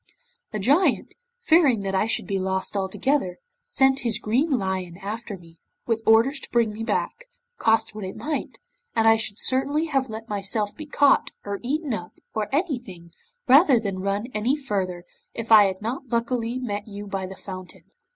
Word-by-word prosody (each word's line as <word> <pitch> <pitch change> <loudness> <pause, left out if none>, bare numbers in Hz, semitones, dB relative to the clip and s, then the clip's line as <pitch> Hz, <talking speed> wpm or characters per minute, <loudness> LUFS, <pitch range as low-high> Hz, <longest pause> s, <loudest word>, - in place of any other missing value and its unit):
The 215 - -3
Giant, 280 - +2 0.3
fearing 315 - +4
that 195 -1 -3
I 195 +3 +2
should - - +1
be 195 -2 -1
lost 190 +1 -2
altogether, 195 +1 0 0.3
sent 265 0 +3
his 230 -4 0
green 240 +8 0
lion 190 - -2
after 210 +1 -6
me, 165 -2 -18 0.3
with 225 -1 0
orders 230 +6 +5
to - - -10
bring 230 -3 +1
me 215 - -7
back, - - -2 0.3
cost 225 -1 +2
what 210 -1 -7
it 185 - -6
might, 300 -1 -4 0.4
and 225 -1 +3
I 225 - +7
should 215 -2 -3
certainly 275 +6 +2
have 270 -3 0
let 220 +1 -7
myself 205 0 -2
be 310 -1 -9
caught, 285 -1 +3 0.2
or 200 -1 -3
eaten 285 +2 -2
up, 175 -4 -5 0.2
or 215 -1 -2
anything, 245 - -3 0.4
rather 270 -1 +6
than 200 -4 -3
run 200 +3 -1
any 225 +6 +1
further, 190 -10 -3 0.3
if 230 0 -5
I 215 -2 +9
had 190 +1 -3
not 255 +4 -4
luckily 235 0 -1
met 210 -5 -4
you 205 0 -7
by 195 -2 -4
the 190 0 -10
fountain. 185 -2 -9
220 Hz, 180 wpm, -24 LUFS, 195-260 Hz, 0.4 s, I